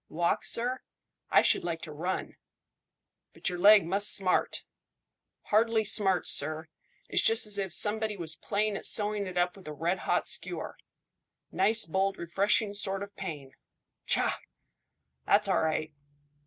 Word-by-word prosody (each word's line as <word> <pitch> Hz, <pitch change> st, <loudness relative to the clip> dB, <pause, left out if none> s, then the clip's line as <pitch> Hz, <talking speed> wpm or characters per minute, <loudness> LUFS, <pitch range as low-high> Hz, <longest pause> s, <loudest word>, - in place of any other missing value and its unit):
"Walk, 170 Hz, +2 st, -1 dB
sir? 250 Hz, +2 st, -1 dB, 0.5 s
I -, -, +4 dB
should -, -, +2 dB
like 165 Hz, -2 st, -5 dB
to 160 Hz, -, -8 dB
run." 175 Hz, +5 st, -5 dB, 1.0 s
"But -, -, -2 dB
your 180 Hz, -1 st, -6 dB
leg 205 Hz, 0 st, +6 dB
must 200 Hz, +4 st, +4 dB
smart." 190 Hz, -2 st, +1 dB, 0.9 s
"Hardly 220 Hz, +1 st, +2 dB
smarts, 195 Hz, -4 st, +1 dB
sir; 155 Hz, +2 st, +1 dB, 0.4 s
it's -, -, +2 dB
just 225 Hz, 0 st, +4 dB
as 205 Hz, -1 st, +1 dB
if 190 Hz, -2 st, -3 dB
somebody 215 Hz, 0 st, +1 dB
was 165 Hz, -3 st, -1 dB
playing 210 Hz, 0 st, -2 dB
at -, -, -2 dB
sewing 210 Hz, -1 st, +2 dB
it 180 Hz, -1 st, -7 dB
up 180 Hz, 0 st, 0 dB
with 195 Hz, -5 st, -15 dB
a 150 Hz, -, -6 dB
red 170 Hz, +5 st, -2 dB
hot -, -, -1 dB
skewer. -, -, -2 dB, 0.8 s
Nice 215 Hz, +4 st, +3 dB
bold 190 Hz, +4 st, -1 dB
refreshing 200 Hz, +4 st, 0 dB
sort 195 Hz, -1 st, -2 dB
of 200 Hz, 0 st, -12 dB
pain. 150 Hz, -8 st, -8 dB, 0.6 s
Tchah! -, -, 0 dB, 0.9 s
That's 205 Hz, 0 st, +3 dB
all 190 Hz, -, +1 dB
right." 155 Hz, -1 st, -2 dB
195 Hz, 150 wpm, -28 LUFS, 170-210 Hz, 1.0 s, leg